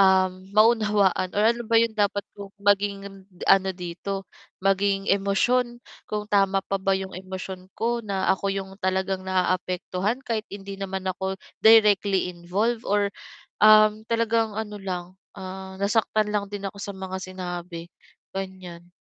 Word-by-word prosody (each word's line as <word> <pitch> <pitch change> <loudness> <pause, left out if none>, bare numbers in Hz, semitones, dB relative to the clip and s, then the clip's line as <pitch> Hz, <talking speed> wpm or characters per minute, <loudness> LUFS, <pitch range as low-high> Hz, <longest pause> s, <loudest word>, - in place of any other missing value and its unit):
um, 190 -1 +5 0.2
maunawaan 210 -4 +3
or 205 - +2
ano 235 +2 +3
ba 230 +1 +3
'yong 230 -1 0
dapat 205 0 +1 0.2
kong 200 -1 -9
maging 200 0 +2
n 195 - -13 0.3
ano 190 0 +5
dito, 185 +2 -5 0.3
maging 195 0 +1
emosyon, 240 +5 +1 0.2
kung 210 0 -4
tama 195 -1 +3
pa 195 0 -2
ba 195 0 +1
'yong 190 0 -4
emosyon 185 0 -7
ko 235 +1 0
na 195 -2 0
ako 195 +1 -2
yung 195 -1 -4
talagang 190 0 -1
naaapektuhan 185 +4 -1
kahit 225 -4 -2
hindi 195 0 -8
naman 190 -1 -4
ako 190 +1 -3 0.3
directly 205 -4 +5
involved 200 +7 -2
or, 205 0 +2 0.5
um, 215 0 +6
talagang 230 -1 +1
ano 210 -1 -5
lang, 185 -3 -4 0.3
ah, 190 0 -7
nasaktan 210 +1 +1
lang 205 -1 -1
din 200 0 -5
ako 200 - -15
sa 200 0 -6
mga 190 0 -5
sinabi, 175 -2 -6 0.4
ganiyan. 185 -3 -7
195 Hz, 145 wpm, -25 LUFS, 190-210 Hz, 0.5 s, um